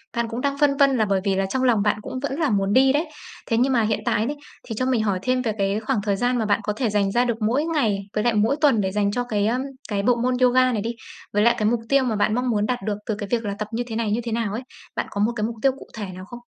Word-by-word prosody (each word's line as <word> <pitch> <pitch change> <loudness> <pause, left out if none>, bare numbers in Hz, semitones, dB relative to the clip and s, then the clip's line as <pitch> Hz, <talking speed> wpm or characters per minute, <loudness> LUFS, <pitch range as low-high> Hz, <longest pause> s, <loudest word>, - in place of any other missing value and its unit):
Bạn 235 -1 0
cũng 235 +2 -4
đang 280 0 -1
phân 280 -2 +3
vân 275 -2 +4
là 220 - +2
bởi 195 -2 +1
vì 195 -2 +1
là 195 0 +1
trong 260 +7 -1
lòng 235 -5 +3
bạn 205 0 +1
cũng 255 - -6
vẫn 280 +3 -3
là 310 - +2
muốn 200 -1 +1
đi 265 +1 +5
đấy, 310 +4 0 0.4
thế 230 - +1
nhưng 260 +3 +2
mà 235 - +3
hiện 215 -1 0
tại 210 - +1
đấy, 290 +4 -3 0.3
thì 225 - -4
cho 255 +4 -1
mình 245 -4 +1
hỏi 195 -3 0
thêm 255 +2 +1
về 230 - -1
cái 200 +1 0
khoảng 220 -1 -1
thời 205 -2 +1
gian 245 +4 0
mà 225 - 0
bạn 205 -1 +2
có 210 - -1
thể 235 +1 -1
dành 200 -1 +1
ra 240 +4 +2
được 235 -2 -2
mỗi 275 +7 +1
ngày, 240 -12 +1
với 210 0 0
lại 240 - +2
mỗi 220 +5 +2
tuần 270 -9 +4
để 190 - -1
dành 200 0 +1
cho 245 +4 -1
cái, 210 -4 0
ờm, 245 +3 0 0.3
cái 200 -2 -1
bộ 245 +1 +4
môn 250 +1 0
yoga 255 0 +4
này 215 -4 -1
đi? 230 +2 -3 0.4
Với 210 +1 +3
lại 235 0 +5
cái 215 - 0
mục 235 +1 +2
tiêu 275 -1 +4
mà 235 -4 0
bạn 215 +1 +1
mong 250 +1 0
muốn 210 -2 +1
đạt 245 +2 -1
được 210 -1 -1
từ 215 -3 -1
cái 205 -1 -6
việc 230 -2 0
là 200 - -2
tập 210 - -3
như 235 +2 -1
thế 220 - -5
này 225 -2 -1
như 225 +3 0
thế 235 - -4
nào 225 -3 -1
ấy? 225 - -3 0.3
Bạn - - -1
có 205 - -3
một 220 +3 +2
cái 215 - -2
mục 230 - -4
tiêu 270 - +4
cụ 270 - -13
thể 215 -2 -5
nào 185 - -9
không? 240 +4 -10
230 Hz, 330 wpm, -23 LUFS, 210-255 Hz, 0.4 s, đi